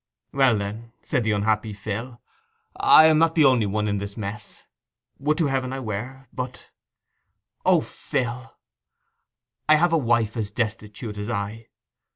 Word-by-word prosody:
'Well, 135 -5 +4
then,' 110 +3 -6
said 130 -6 0
the 110 - +1
unhappy 105 +1 0
Phil, 110 +4 -6 0.6
'I 155 - +7
am 160 -1 +5
not 165 0 +3
the 155 -3 +5
only 125 -6 +4
one 105 +1 -1
in 100 -1 0
this 100 +1 -7
mess. 105 0 -7 0.6
Would 150 +2 +1
to 170 - +2
Heaven 135 -2 -1
I 135 - -4
were! 125 +3 -6
But—' 125 -1 -6 1.0
'O, - - +5
Phil!' 125 +1 -4 1.1
'I 155 - +8
have 170 +2 +2
a 165 - +4
wife 115 -4 +1
as 110 -3 -2
destitute 105 0 -4
as 105 +2 -4
I. 110 0 -4
115 Hz, 155 wpm, -24 LUFS, 105-130 Hz, 1.1 s, I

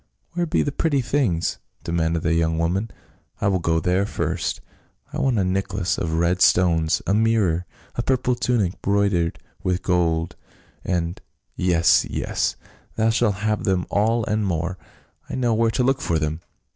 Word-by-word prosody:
"Where 175 0 -1
be 160 - +1
the 145 - -1
pretty 145 -1 +1
things?" 115 - 0 0.2
demanded 85 -1 0
the 80 - +2
young 80 -1 +1
woman, 90 +7 0 0.3
" - - -39
I 100 - 0
will 95 -2 +1
go 80 -1 +1
there 90 +4 +1
first. - - -2 0.5
I - - -3
want 130 -4 +2
a 100 - +2
neck 95 +1 -1
lace 95 -3 0
of 80 -2 -1
red 85 +2 +1
stones 80 -3 +3
— - - -35
a 95 - +1
mirror 105 -6 +2
— - - -29
a - - +1
purple 125 0 +1
tunic 120 -7 0
broidered 100 -4 +1 0.2
with 90 0 -1
gold, 85 -2 +1 0.5
and 85 -1 -2
— - - -49
" - - -54
" - - -46
Yes, 85 -2 +4
yes! - - -1 0.4
Thou 110 0 +2
shalt 110 -3 +2
hav^e 105 -1 0
them 95 -2 +1
all 110 +2 +2
and 105 0 0
more; 90 0 -2 0.5
I - - -4
know 120 -3 +1
where 115 +1 +2
to 125 - 0
look 135 +2 +1
for 85 - 0
them. 80 +1 -2
95 Hz, 190 wpm, -23 LUFS, 85-115 Hz, 0.5 s, Yes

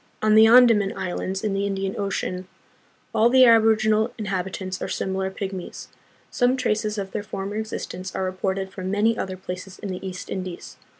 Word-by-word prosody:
On 215 0 +4
the 220 +1 +8
Andaman 230 -4 +5
Islands 185 +2 -3
in 210 -2 0
the 200 +1 0
Indian 195 -1 -2
Ocean, 185 -2 -3 0.7
all 225 +1 +4
the 260 +1 +6
aborig 225 -2 +6
inal 220 +1 +2
inhabitants 190 -2 -4
are - - -2
similar 190 0 -2
pygmies. 190 -2 -6 0.4
Some 250 +1 +2
traces 215 -3 -1
of 195 -1 -4
their - - -3
former 205 0 -5
existence 190 -4 -5
are 190 - -1
reported 190 +1 -2
from 185 -1 -5
many 210 +3 +2
other 190 -4 -4
places 185 +1 -7
in 200 - -6
the 185 0 -5
East 185 -1 -6
Indies. 185 -2 -6
195 Hz, 175 wpm, -24 LUFS, 190-220 Hz, 0.7 s, the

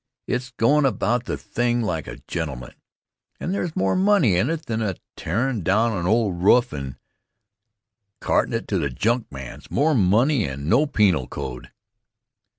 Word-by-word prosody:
It's 125 0 -2
goin' 135 +5 +2
about 120 -1 +1
the - - -3
thing 120 0 -1
like 80 -7 -2
a - - -7
gentleman, 70 -8 -5 0.7
and 180 - -3
there's 175 -5 -3
more 95 0 +1
money 190 - +3
in 110 +10 +2
it 165 -1 -3
than 115 -1 -2
in 100 -4 -1 0.2
tearin' 115 +6 -1
down 110 +6 +2
an 90 -2 -2
old 105 -5 +1
roof 120 +6 +4
and 70 -3 -5 1.2
cartin' - - +1
it - - -3
to - - +1
the 70 - -1
junkman's 70 - -3
more 155 +3 +2
money 115 +4 +3
and 70 +2 -5
no 130 - +3
penal 95 - +2
code. 65 -3 -7
110 Hz, 155 wpm, -23 LUFS, 85-125 Hz, 1.2 s, roof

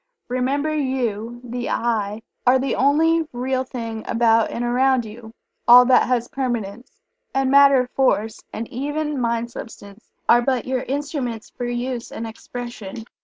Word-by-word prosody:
Remember, 275 +5 0
You 240 -5 -2
the 245 0 -4
"I" 220 -2 -1 0.2
are 255 +1 +6
the 265 +1 -1
only 320 +4 +3
Real 255 +1 -1
thing 230 -3 -6
about 230 -1 +3
and 240 - -3
around 255 0 +2
you 220 +1 -10 0.4
all 245 +1 +9
that 255 0 +4
has 245 -2 0
permanence 245 - -4 0.4
and 270 -1 +2
Matter, 275 -2 +6
Force 225 -4 0
and 225 +1 -5
even 295 +2 -3
Mind 235 0 -1
substance, 205 -2 -11 0.2
are 240 - +6
but 255 0 0
your 255 -1 -1
instruments 270 -5 -4
for 245 - -5
use 240 0 -3
and 230 - -5
expression. 225 -1 -8
245 Hz, 145 wpm, -22 LUFS, 230-265 Hz, 0.4 s, all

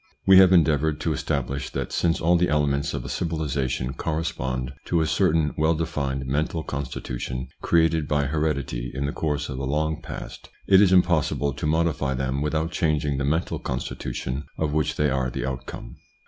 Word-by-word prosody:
We 95 0 +8
have 95 -1 +7
endeavoured 80 -3 +3
to 80 - 0
establish, 70 -2 -2
that - - -3
since 85 -1 +1
all 85 +2 +3
the 90 +1 +2
elements 70 -2 +1
of - - -5
a - - -4
civili 80 -2 -2
sation 65 -1 -1
correspond 70 -6 -2
to 85 - +1
a - - +2
certain 80 -1 +2
well 80 +2 +3
defined 70 -5 -2
mental 75 +4 -1
constitution 65 -2 -4
created 80 -2 +2
by 75 -1 +1
heredity 70 -5 -1
in 70 +2 -1
the 70 - -2
course 75 -2 -1
of 65 -2 -5
a - - -4
long 75 +3 -1
past, - - -8 0.2
it 95 0 +7
is 100 -3 +5
impossible 80 -6 +2
to 75 - -3
modify 75 -4 +1
them 65 +1 -1
without 80 +2 -1
changing 75 -5 0
the 70 - 0
mental 80 +5 0
constitution 65 +2 -4
of 75 -2 -1
which 75 -2 0
they 75 -2 +1
are 65 -1 0
the - - -4
outcome. 65 0 -6
75 Hz, 180 wpm, -25 LUFS, 65-80 Hz, 0.2 s, We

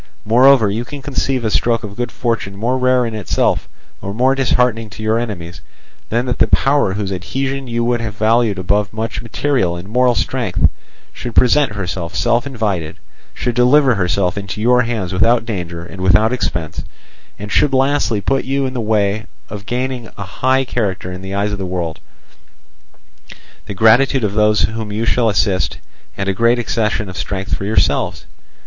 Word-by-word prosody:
Moreover, 120 0 +5
can 100 - -2
you 120 - -2
conceive 135 -1 -2
a 110 - 0
stroke 115 +1 +1
of 100 -1 -7
good 120 +1 -3
fortune 115 -5 -2
more 115 +6 -1
rare 130 -1 +2
in 115 - -4
itself, 105 -3 0 0.3
or 100 +1 -5
more 130 +3 +3
disheartening 125 -4 +1
to 105 +2 -9
your 110 +1 +1
enemies, 90 -8 -6 0.5
than 120 +3 0
that 125 -1 -2
the - - +4
power 135 -7 +2
whose 100 -1 -3
adhesion 135 +8 -3
you 120 0 -1
would 120 0 0
have 110 -2 -5
valued 110 -1 +2
above 100 +3 0
much 110 0 -3
material 115 -6 0
and 85 +2 -8
moral 125 +2 +2
strength - - +1 0.5
should 120 -2 -7
present 130 -1 +4
herself 90 -3 -4
self 120 +3 +1
invited, 100 - -2 0.4
should 120 - -2
deliver 130 +3 +4
herself 90 -1 0
into 100 +1 -6
your 125 +3 +4
hands 110 -7 -2
without 115 +5 +3
danger 85 -6 -5
and 95 +1 -9
without 95 +6 +4
expense, 85 -10 -3 0.6
and 105 0 -8
should 145 - +3
lastly 135 -5 +1
put 135 +5 0
you 135 +1 -1
in 130 - -3
the 125 - -2
way 105 0 0 0.2
of 105 0 -8
gaining 125 -1 -3
a 100 - -4
high 130 +7 0
character 100 -7 -2
in 90 0 -7
the 95 +1 -5
eyes 100 +1 0
of 105 - -4
the - - -3
world, 85 -3 -3 1.7
the 100 - -5
gratitude 120 +5 +4
of 100 -2 0
those 105 0 +3
whom 110 -1 -2
you 110 +3 -2
shall 115 0 +2
assist, 95 -2 +1 0.4
and 100 - -2
a 95 - +1
great 115 +5 +3
accession 110 -3 -1
of 90 - -8
strength 95 0 -4
for 100 - -5
yourselves? 110 +2 0
110 Hz, 180 wpm, -17 LUFS, 100-125 Hz, 1.7 s, Moreover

